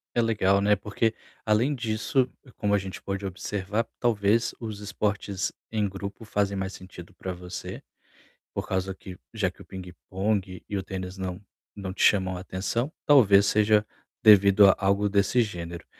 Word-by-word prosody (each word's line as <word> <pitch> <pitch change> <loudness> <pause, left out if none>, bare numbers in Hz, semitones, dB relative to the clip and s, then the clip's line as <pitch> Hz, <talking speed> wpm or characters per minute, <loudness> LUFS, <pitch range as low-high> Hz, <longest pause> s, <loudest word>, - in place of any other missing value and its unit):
É 120 - +4
legal, 100 -3 +3
né, 105 +1 +4
porque, 105 +3 -1 0.3
além 115 +7 +2
disso, 120 +2 0 0.3
como 105 -1 0
a - - +5
gente 95 0 -7
pode 100 0 -4
observar, 100 +3 -2
talvez 110 -1 +2
os 110 -3 -6
esportes 100 -1 -2 0.2
em 105 -2 +1
grupo 100 +3 -7
fazem 100 -1 0
mais 95 0 -3
sentido 90 -2 -11
pra 95 - -5
você, 90 0 -7 0.7
por - - -4
causa 95 0 -1
que 95 0 -10 0.2
já 100 -5 0
que - - -18
o - - -12
pingue-pongue 95 +1 -4
e 100 - -3
o - - -1
tênis 95 0 -6
não 95 0 -4 0.4
não 95 -2 -5
te - - -1
chamam 95 -2 +4
a 90 - -6
atenção, 115 +9 -2
talvez, 105 -9 +6
seja 105 0 +3 0.4
devido 100 -2 +7
a 95 - +6
algo 100 +1 +2
desse 100 +5 +2
gênero. 85 -5 -5
100 Hz, 165 wpm, -26 LUFS, 95-105 Hz, 0.7 s, devido